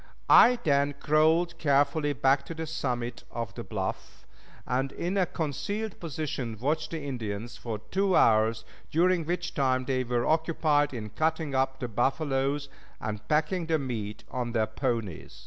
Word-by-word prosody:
I 250 - +8
then 140 -1 +2
crawled 160 +3 +3
carefully 145 +1 +2
back 135 +2 +3
to 165 - -6
the 160 0 -4
summit 125 -6 -3
of 115 -4 -5
the - - -6
bluff, - - -5 0.4
and 135 +2 -1
in 175 +6 -3
a 190 -3 +2
concealed 200 +7 -3
position 140 -8 -4
watched 155 +5 0
the 160 -3 -5
Indians 115 -3 -4
for 115 -3 -5
two 190 - 0
hours, 110 0 +4 0.2
during 175 +1 +2
which 175 +1 -2
time 130 -3 +1
they 130 -1 0
were 120 -1 0
occupied 155 -2 +2
in 110 -5 -6
cutting 160 0 -1
up 130 0 0
the 125 - -3
buffaloes 135 +3 0 0.3
and 105 -1 -5
packing 160 +3 +1
the 160 -1 +2
meat 110 -7 -4
on 120 -2 -3
their 110 -2 +2
ponies. 110 - -3
140 Hz, 155 wpm, -28 LUFS, 120-160 Hz, 0.4 s, I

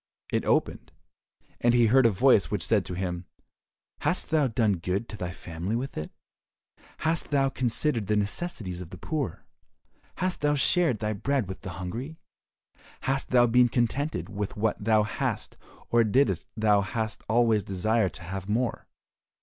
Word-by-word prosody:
It - - 0
opened, - - 0 0.7
and 120 0 +3
he 120 -1 +5
heard 125 +2 +5
a - - +4
voice 110 0 +4
which 100 -5 -1
said 105 -4 +2
to 90 - -5
him, 90 -1 -3 0.7
"Hast - - -1
thou 155 -3 +3
done 110 -4 +1
good 90 +6 -2
to - - -6
thy 90 -3 -4
family 90 +3 -4
with 130 +3 -3
it? 75 - -4 1.0
Hast 165 +1 0
thou 135 -2 +2
considered 125 -2 0
the 105 - +2
necessities 105 - -2
of 85 - -8
the 90 - -9
poor? 140 - -3 0.7
Hast 185 0 -2
thou 145 0 +2
shared 165 -2 +2
thy 105 +1 -2
bread 130 +2 -1
with 95 - -7
the 95 - -6
hungry? 120 - -5 0.8
Hast 135 0 -1
thou 120 -1 +5
been 120 +1 +4
contented 120 - -1
with 105 -1 -4
what 105 0 0
thou 110 0 +4
hast, 105 - -3 0.4
or 120 0 +5
didst 110 - +2
thou 105 -2 +3 0.5
always 115 -2 +3
desire 100 +2 +1
to 90 - -11
have 95 +3 -6
more?" 120 +3 -1
110 Hz, 160 wpm, -27 LUFS, 95-130 Hz, 1.0 s, he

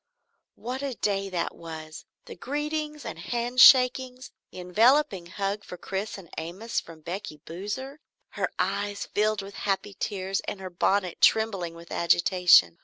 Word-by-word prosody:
What 255 +3 -5
a 275 -3 -3
day 195 -2 -1
that 175 -2 -2
was! 160 -1 -9 0.2
The - - -9
greetings 300 +2 -3
and - - -6
handshakings; 250 +1 +4 0.2
the - - -13
enveloping 210 +1 +3
hug 200 +3 -3
for 180 - -9
Chris 195 +4 -4
and 190 -3 -12
Amos 185 +8 -3
from 165 -1 -13
Becky 175 -1 -6
Boozer, 210 - -6 0.3
her - - -2
eyes 205 0 -1
filled 215 -1 0
with 200 +1 -10
happy 200 +1 -2
tears 195 -1 -2
and 200 - -4
her 185 -1 -7
bonnet 185 0 0
trembling 195 -7 +3
with 170 0 -13
agitation. 175 - +4
200 Hz, 145 wpm, -27 LUFS, 180-240 Hz, 0.3 s, handshakings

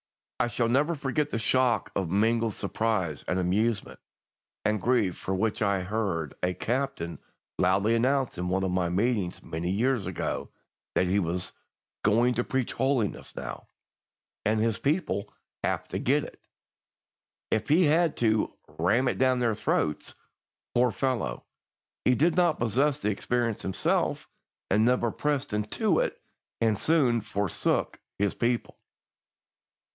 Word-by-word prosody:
I - - +3
shall 120 0 0
never 145 +7 +2
forget 145 +1 -1
the - - -2
shock 120 0 +2
of 95 -4 -1
mingled 110 +3 +2
surprise 100 -7 -1
and 90 - 0
amusement 105 +4 0 0.7
and 105 -1 +1
grief 115 -7 +1
with 95 0 0
which 110 +1 0
I 100 -2 +2
heard 90 -7 -2
a 90 0 0
Captain 125 -9 -2 0.4
loudly 100 +5 +3
announce 130 -1 +1
in 90 - -2
one 95 +1 +1
of 95 - 0
my 90 -1 +1
meetings 100 -1 0
many 80 +2 -3
years 115 +1 +1
ago 95 - -3 0.5
that 95 - +3
he 95 +3 +2
was 90 -1 -2 0.5
"going 115 +4 +3
to 120 +1 0
preach 130 -1 -1
holiness 130 -6 -1
now," - - -6 0.8
and 110 +1 +2
his 110 -1 +1
people 140 - -1 0.3
"have - - -1
to - - -3
get - - +2
it," - - -11 1.1
if 110 +3 0
he 165 +5 +5
had 165 +1 +3
to 110 -2 +1 0.2
"ram 115 +10 +3
it - - -1
down 130 -1 +3
their 120 -2 +2
throats." 75 -6 -1 0.6
Poor 125 +1 +4
fellow! 115 - -2 0.6
He 125 - +4
did 160 +4 +3
not 175 -3 +3
possess 135 +5 +1
the 105 -8 0
experience 120 +1 -1
himself, 95 - 0 0.4
and 105 +3 +4
never 120 -1 +2
pressed 145 -4 -1
into 155 - +1
it - - -1 0.4
and 110 -3 +2
soon 135 -8 +3
forsook 100 -3 -1 0.2
his 100 -1 +1
people. 120 0 -1
115 Hz, 145 wpm, -28 LUFS, 95-130 Hz, 1.1 s, he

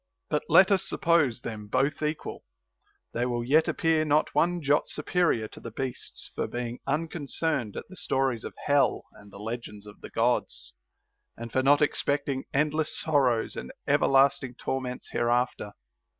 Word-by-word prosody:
But 150 - +2
let 190 +1 +7
us 195 -2 +3
suppose 155 -9 +2
them 105 -3 -6
both 140 +8 0
equal; 150 0 -3 0.7
they 120 +1 0
will 120 -1 -1
yet 150 +6 +3
ap - - -2
pear 160 -1 +2
not 150 0 +2
one 175 +1 +2
jot 145 +1 +2
superior 150 -8 0
to - - -12
the 115 - -7
beasts 130 +3 -6
for - - -2
being 120 0 -5
uncon 155 +1 -2
cerned 150 -10 -1
at - - -6
the 185 - -12
stories 135 -8 0
of - - -7
hell 145 -1 +3
and 100 0 -16
the - - -11
legends 105 -1 -6
of 105 0 -13
the - - -9
Gods, 120 +2 -1 0.6
and 115 0 -7
for 130 - +2
not 145 +2 +5
expecting 140 -2 -1
endless 150 +2 0
sorrows 135 -7 +1
and 65 - -6 0.2
everlasting 135 -2 +3
tor 135 +1 -2
ments 125 -1 -6
hereafter. 120 -3 0
135 Hz, 165 wpm, -27 LUFS, 120-150 Hz, 0.7 s, let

